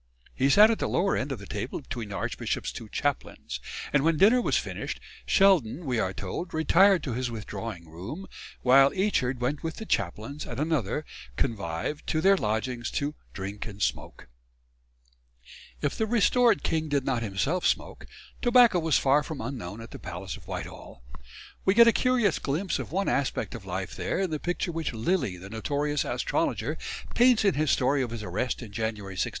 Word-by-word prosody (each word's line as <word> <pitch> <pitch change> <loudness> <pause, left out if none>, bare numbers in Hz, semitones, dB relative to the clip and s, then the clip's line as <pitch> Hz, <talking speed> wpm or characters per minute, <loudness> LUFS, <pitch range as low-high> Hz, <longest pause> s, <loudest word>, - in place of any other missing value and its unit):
He 135 +1 +2
sat 210 +9 +7
at 225 - -1
the - - -1
lower 195 +2 +2
end 135 +2 -2
of 135 - -2
the 100 - -10
table 105 +6 -4
between 120 -6 -6
the 100 - -5
archbishop's 85 - -2
two 110 - -9
chaplains; 145 +3 -3 0.3
and 140 -1 +4
when 165 0 +3
dinner 225 +9 +6
was - - +2
finished, - - -4 0.3
Sheldon, 175 - +3
we 125 -4 0
are 95 -4 0
told, 100 - -5
retired 185 +4 +5
to 130 - -3
his 125 +1 -2
withdrawing 100 -6 -6
room, 95 - -7 0.4
while 135 +2 +7
Eachard 135 -11 +1
went 135 +4 -1
with 160 0 -4
the 220 - -7
chaplains 110 - -2
and - - -5
another 150 -3 0 0.3
convive 100 - -2
to 155 - +1
their 195 +4 +5
lodgings 120 - -2
"to 145 +1 -1 0.2
drink 100 +3 -6
and 100 -2 -9
smoak." - - -3 1.6
If 145 - 0
the 220 - 0
restored 240 +2 +3
king 160 -1 0
did 140 -2 0
not 125 -3 0
himself 115 - 0
smoke, - - -2 0.3
tobacco 240 -6 +6
was 160 -3 +2
far 140 +2 +4
from 150 -1 -6
unknown 115 -4 -5
at 115 - -10
the - - -9
Palace 90 +1 -6
of - - -14
Whitehall. 65 - -7 0.6
We 190 - +3
get 235 0 +8
a 230 - +6
curious 245 - +2
glimpse 165 +7 -1
of - - -6
one 195 +3 0
aspect 140 -1 -1
of 115 -5 -8
life 95 0 -4
there - - -2
in 190 -4 -1
the 155 - -2
picture 175 +1 -2
which 165 -4 -3
Lilly, 115 - 0
the 95 +3 -10
notorious 145 +6 -1
astrologer, - - -1 0.3
paints 240 -3 +5
in 195 - +4
his 155 0 0
story 135 +3 +2
of 125 - -1
his 115 -2 -6
arrest 110 +7 -2
in 110 - -10
January 105 -2 -3
1661. 95 - -1
140 Hz, 185 wpm, -27 LUFS, 110-175 Hz, 1.6 s, get